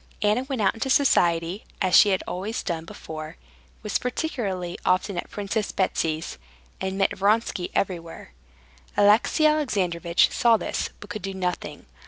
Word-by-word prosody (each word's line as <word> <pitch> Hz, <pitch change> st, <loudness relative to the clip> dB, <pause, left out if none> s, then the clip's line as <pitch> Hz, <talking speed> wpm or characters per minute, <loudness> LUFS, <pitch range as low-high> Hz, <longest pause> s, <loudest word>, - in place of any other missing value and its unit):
Anna 210 Hz, +4 st, +3 dB
went 265 Hz, -5 st, -2 dB
out 195 Hz, -, +3 dB
into 230 Hz, +4 st, -3 dB
society, 175 Hz, -9 st, +2 dB, 0.2 s
as 185 Hz, -3 st, 0 dB
she 205 Hz, -, +8 dB
had 190 Hz, -1 st, +1 dB
always 200 Hz, +5 st, -3 dB
done, 165 Hz, -2 st, -3 dB, 1.0 s
was 210 Hz, -, 0 dB
particularly 205 Hz, -, -3 dB
often 185 Hz, +2 st, +1 dB
at 175 Hz, -, -4 dB
Princess 205 Hz, +1 st, -2 dB
Betsy's, 160 Hz, -, -1 dB, 0.4 s
and 190 Hz, 0 st, -2 dB
met 195 Hz, -, +1 dB
Vronsky 200 Hz, -2 st, +1 dB
everywhere. 170 Hz, -, -3 dB, 0.7 s
Alexey 210 Hz, +9 st, +4 dB
Alexandrovitch 185 Hz, -, +2 dB
saw 235 Hz, -2 st, +4 dB
this, -, -, -3 dB
but 205 Hz, -, -10 dB
could 215 Hz, -, -5 dB
do 195 Hz, 0 st, -5 dB
nothing. 180 Hz, -1 st, -4 dB
195 Hz, 140 wpm, -25 LUFS, 180-220 Hz, 1.0 s, she